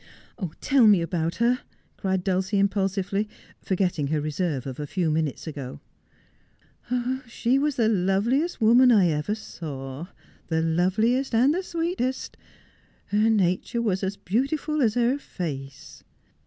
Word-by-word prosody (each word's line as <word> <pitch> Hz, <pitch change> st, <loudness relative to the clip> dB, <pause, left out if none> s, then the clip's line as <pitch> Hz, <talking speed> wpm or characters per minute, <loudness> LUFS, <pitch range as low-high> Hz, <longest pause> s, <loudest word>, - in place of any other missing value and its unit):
' 205 Hz, -, -5 dB, 0.2 s
Tell 265 Hz, -5 st, +5 dB
me 205 Hz, -3 st, +6 dB
about 165 Hz, -1 st, -2 dB
her,' 240 Hz, +2 st, +2 dB, 0.4 s
cried 190 Hz, -2 st, -1 dB
Dulcie 190 Hz, +2 st, 0 dB
impulsively, 195 Hz, +1 st, 0 dB, 0.3 s
forgetting 180 Hz, -6 st, 0 dB
her 155 Hz, +1 st, 0 dB
reserve 150 Hz, -2 st, -2 dB
of 130 Hz, 0 st, -6 dB
a 150 Hz, -, -4 dB
few 170 Hz, 0 st, 0 dB
minutes 155 Hz, -3 st, -1 dB
ago. 140 Hz, -5 st, -6 dB, 0.8 s
' -, -, -42 dB, 0.7 s
She 240 Hz, +3 st, +1 dB
was 295 Hz, -1 st, 0 dB
the 230 Hz, -5 st, +2 dB
loveliest 220 Hz, -, +1 dB
woman 245 Hz, +3 st, +6 dB
I 195 Hz, -6 st, +5 dB
ever 155 Hz, +7 st, -1 dB
saw 145 Hz, -7 st, -7 dB, 0.2 s
— -, -, -30 dB
the 160 Hz, -1 st, 0 dB
loveliest 215 Hz, +11 st, +1 dB
and 260 Hz, +6 st, +4 dB
the 365 Hz, -, -1 dB
sweetest. 335 Hz, -7 st, -2 dB, 0.7 s
Her 210 Hz, +2 st, +3 dB
nature 195 Hz, +2 st, +1 dB
was 195 Hz, -3 st, 0 dB
as 195 Hz, +1 st, -2 dB
beautiful 275 Hz, -, -1 dB
as 225 Hz, -3 st, +2 dB
her 245 Hz, +3 st, +2 dB
face.' 140 Hz, -, -7 dB
195 Hz, 140 wpm, -25 LUFS, 165-240 Hz, 0.8 s, me